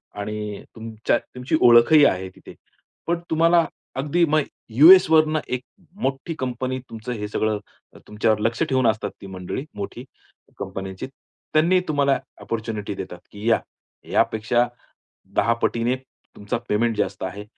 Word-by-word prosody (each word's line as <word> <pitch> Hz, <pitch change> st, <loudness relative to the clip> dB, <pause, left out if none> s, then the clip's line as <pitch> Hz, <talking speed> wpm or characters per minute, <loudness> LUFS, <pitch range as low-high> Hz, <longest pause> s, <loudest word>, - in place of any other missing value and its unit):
आणि 105 Hz, 0 st, -4 dB
अ, -, -, -12 dB
तुमच्या 115 Hz, 0 st, -1 dB
तुमची 125 Hz, +6 st, -4 dB
ओळखही 120 Hz, +6 st, +7 dB
आहे 95 Hz, -4 st, +1 dB
तिथे. -, -, -13 dB, 0.5 s
पण 170 Hz, 0 st, +1 dB
तुम्हाला 165 Hz, +1 st, +4 dB, 0.3 s
अगदी 150 Hz, +6 st, +1 dB
मग 155 Hz, +1 st, +3 dB, 0.3 s
यूएसवरनं 155 Hz, +3 st, +7 dB
एक 125 Hz, 0 st, -2 dB, 0.4 s
मोठी 135 Hz, +5 st, -2 dB
कंपनी 130 Hz, 0 st, -2 dB
तुमचं 115 Hz, +2 st, -7 dB
हे 105 Hz, -3 st, -4 dB
सगळं, 105 Hz, 0 st, -1 dB, 0.5 s
तुमच्यावर 105 Hz, 0 st, +1 dB
लक्ष 115 Hz, +5 st, -1 dB
ठेवून 130 Hz, -5 st, +2 dB
असतात 110 Hz, -1 st, 0 dB
ती 100 Hz, -, -9 dB
मंडळी, 95 Hz, +6 st, -5 dB
मोठी 105 Hz, +4 st, -6 dB, 0.6 s
कंपन्यांची. 95 Hz, 0 st, -5 dB, 0.5 s
त्यांनी 170 Hz, +4 st, +4 dB
तुम्हाला 140 Hz, -2 st, +2 dB, 0.2 s
अपॉर्च्युनिटी 110 Hz, -2 st, -4 dB
देतात 90 Hz, -2 st, -7 dB
की 105 Hz, +3 st, -3 dB
"या, 115 Hz, -, +4 dB, 0.5 s
यापेक्षा 120 Hz, +3 st, +2 dB, 0.7 s
दहा 115 Hz, -, +3 dB
पटीने 115 Hz, +1 st, 0 dB, 0.4 s
तुमचा 105 Hz, +3 st, -3 dB
पेमेंट 115 Hz, +2 st, +1 dB
जास्त -, -, -2 dB
आहे. 100 Hz, +2 st, -5 dB
115 Hz, 135 wpm, -23 LUFS, 105-140 Hz, 0.7 s, ओळखही